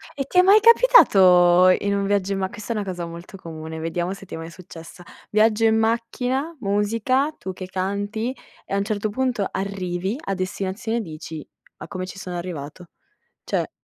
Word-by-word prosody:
E 275 Hz, -2 st, -3 dB
ti 360 Hz, -, +3 dB
è -, -, +10 dB
mai 395 Hz, +3 st, +6 dB
capitato, 185 Hz, -, +6 dB
in 200 Hz, +2 st, +2 dB
un 200 Hz, 0 st, 0 dB
viaggio 200 Hz, -1 st, 0 dB
in -, -, -2 dB
ma 190 Hz, 0 st, -1 dB
questa 215 Hz, +3 st, -5 dB
è -, -, -7 dB
una 210 Hz, -, -1 dB
cosa 175 Hz, -2 st, -4 dB
molto 170 Hz, +3 st, -10 dB
comune, 160 Hz, -2 st, -8 dB
vediamo 175 Hz, +3 st, -2 dB
se 195 Hz, 0 st, -11 dB
ti -, -, -12 dB
è -, -, -4 dB
mai 165 Hz, 0 st, -7 dB
successa. 175 Hz, 0 st, -12 dB, 0.3 s
Viaggio 215 Hz, +1 st, +3 dB
in 220 Hz, 0 st, +4 dB
macchina, 245 Hz, +7 st, -1 dB
musica, 230 Hz, +8 st, 0 dB
tu 190 Hz, -, -6 dB
che 185 Hz, -, -7 dB
canti 205 Hz, +6 st, -3 dB, 0.3 s
e -, -, -7 dB
a -, -, +2 dB
un 200 Hz, -, +1 dB
certo 215 Hz, 0 st, -2 dB
punto 240 Hz, -3 st, -1 dB
arrivi 190 Hz, +2 st, -3 dB
a 195 Hz, -, -1 dB
destinazione 190 Hz, +4 st, -3 dB
e -, -, -1 dB
dici: 160 Hz, -3 st, -8 dB, 0.3 s
"Ma -, -, -9 dB
come 185 Hz, -2 st, -5 dB
ci 185 Hz, -, -10 dB
sono 180 Hz, -2 st, -6 dB
arrivato?" 170 Hz, -1 st, -7 dB, 0.6 s
Cioè. -, -, -2 dB
195 Hz, 195 wpm, -23 LUFS, 180-225 Hz, 0.6 s, è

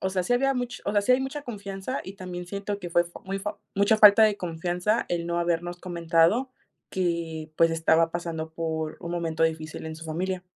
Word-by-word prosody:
o 190 Hz, -, -1 dB
sea, 185 Hz, -1 st, 0 dB
sí 215 Hz, -, -1 dB
había 275 Hz, +2 st, +2 dB
much 245 Hz, -1 st, -3 dB
o 205 Hz, -, 0 dB
sea, 205 Hz, -, +4 dB
sí 250 Hz, -, +4 dB
hay 255 Hz, -, +4 dB
mucha 275 Hz, +2 st, -4 dB
confianza 200 Hz, +1 st, -5 dB
y 190 Hz, -, -8 dB
también 180 Hz, -2 st, -6 dB
siento 200 Hz, +2 st, -4 dB
que 175 Hz, -3 st, -7 dB
fue 175 Hz, 0 st, +3 dB
fo 170 Hz, -, -12 dB
muy 195 Hz, +1 st, -3 dB
fo 210 Hz, +1 st, -5 dB, 0.2 s
mucha 200 Hz, +2 st, +4 dB
falta 210 Hz, +1 st, +9 dB
de 215 Hz, -2 st, +5 dB
confianza 180 Hz, +5 st, -1 dB
el 170 Hz, -1 st, -1 dB
no 170 Hz, 0 st, -1 dB
habernos 175 Hz, +1 st, -1 dB
comentado 170 Hz, +7 st, +2 dB, 0.4 s
que, 170 Hz, -3 st, -2 dB
pues, 165 Hz, 0 st, +5 dB
estaba 165 Hz, 0 st, +3 dB
pasando 165 Hz, -2 st, -4 dB
por 160 Hz, -1 st, -3 dB
un 170 Hz, -, -6 dB
momento 165 Hz, -2 st, -1 dB
difícil 160 Hz, -1 st, -1 dB
en 160 Hz, 0 st, -6 dB
su 160 Hz, -, -10 dB
familia. 180 Hz, +3 st, -2 dB
175 Hz, 215 wpm, -26 LUFS, 165-200 Hz, 0.4 s, falta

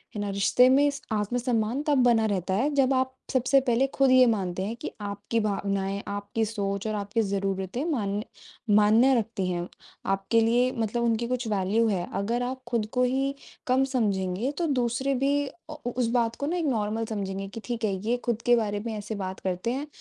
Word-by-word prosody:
है 205 Hz, -, -2 dB
ना? 205 Hz, -, -2 dB
रिश्ते 200 Hz, +5 st, +4 dB
में 280 Hz, +2 st, +5 dB, 0.2 s
आत्म-सम्मान 230 Hz, +3 st, 0 dB
तब 290 Hz, -2 st, +3 dB
बना 235 Hz, -2 st, +4 dB
रहता 190 Hz, -3 st, -1 dB
है 245 Hz, +10 st, +2 dB
जब 270 Hz, -1 st, +3 dB
आप 260 Hz, 0 st, 0 dB, 0.2 s
सबसे 260 Hz, +2 st, +4 dB
पहले 250 Hz, 0 st, +2 dB
खुद 270 Hz, -1 st, +3 dB
ये 255 Hz, 0 st, +7 dB
मानते 190 Hz, -5 st, 0 dB
हैं 215 Hz, +4 st, -3 dB
कि 240 Hz, -, -6 dB
आपकी 205 Hz, +3 st, -2 dB
भावनाएँ, 200 Hz, -1 st, -1 dB
आपकी 205 Hz, +2 st, -2 dB
सोच 200 Hz, -2 st, -3 dB
और 215 Hz, -, -1 dB
आपकी 205 Hz, +2 st, -1 dB
ज़रूरतें 195 Hz, +3 st, -2 dB
मान्य 205 Hz, -6 st, -1 dB, 0.5 s
मान्य 220 Hz, +5 st, +5 dB
रखती 210 Hz, -4 st, -3 dB
हैं, 175 Hz, -1 st, -2 dB, 0.4 s
आपके 195 Hz, +4 st, +1 dB
लिए 240 Hz, +3 st, +3 dB
मतलब 230 Hz, 0 st, -1 dB
उनकी 235 Hz, 0 st, +1 dB
कुछ 250 Hz, -1 st, -2 dB
वैल्यू 210 Hz, +2 st, +1 dB
है। 185 Hz, -5 st, -1 dB
अगर 235 Hz, +5 st, -1 dB
आप 260 Hz, +1 st, -4 dB
खुद 235 Hz, -3 st, 0 dB
को 250 Hz, -, +2 dB
ही 270 Hz, +2 st, +1 dB, 0.3 s
कम 260 Hz, +1 st, +3 dB
समझेंगे 200 Hz, 0 st, 0 dB
तो 340 Hz, -, 0 dB
दूसरे 245 Hz, +3 st, 0 dB
भी 275 Hz, +2 st, +1 dB
अ, 345 Hz, -, -11 dB
उस 245 Hz, 0 st, 0 dB
बात 230 Hz, -2 st, +1 dB
को 285 Hz, -, -4 dB
ना 345 Hz, +3 st, -1 dB
एक 340 Hz, -, -1 dB
नॉर्मल 225 Hz, -4 st, 0 dB
समझेंगे 195 Hz, -3 st, -4 dB
कि 215 Hz, +4 st, -8 dB
ठीक 240 Hz, -1 st, -4 dB
है, 200 Hz, -, 0 dB
ये 240 Hz, +2 st, +2 dB
खुद 235 Hz, -2 st, -1 dB
के 245 Hz, -, +6 dB
बारे 210 Hz, -3 st, -1 dB
में 230 Hz, -, -3 dB
ऐसे 210 Hz, +1 st, -5 dB
बात 185 Hz, 0 st, -6 dB
करते 185 Hz, +4 st, -2 dB
हैं, 275 Hz, +4 st, -3 dB
225 Hz, 200 wpm, -27 LUFS, 200-250 Hz, 0.5 s, ये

